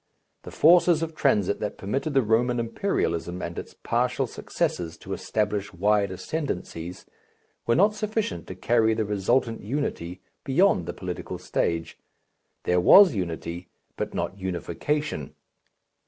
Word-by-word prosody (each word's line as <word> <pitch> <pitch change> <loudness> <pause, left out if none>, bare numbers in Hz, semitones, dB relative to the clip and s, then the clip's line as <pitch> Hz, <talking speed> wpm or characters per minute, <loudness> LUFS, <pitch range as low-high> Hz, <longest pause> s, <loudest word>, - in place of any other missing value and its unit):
The - - -9
forces 170 0 +5
of 165 0 -4
transit 105 -10 +1
that 105 - -4
permitted 135 +9 -2
the 135 - +5
Roman 120 +3 +2
imperialism 90 - -1
and 85 -2 -4
its - - -10
partial - - 0
successors 85 -2 -3
to - - -7
establish 105 -1 -2
wide 100 +2 +2
ascendancies, 90 - -5 0.6
were 115 - +4
not 205 +3 +4
sufficient 215 - -2
to 95 - -7
carry 110 +3 +2
the 110 -1 0
resultant 115 +4 0
unity 100 - -3 0.2
beyond 140 - +3
the - - -3
political - - -5
stage. 85 -1 -2 0.6
There 90 0 +2
was 195 - +8
unity, 85 -2 -4 0.3
but - - -4
not 100 - -3
unification. 95 - -3
105 Hz, 130 wpm, -26 LUFS, 90-145 Hz, 0.6 s, was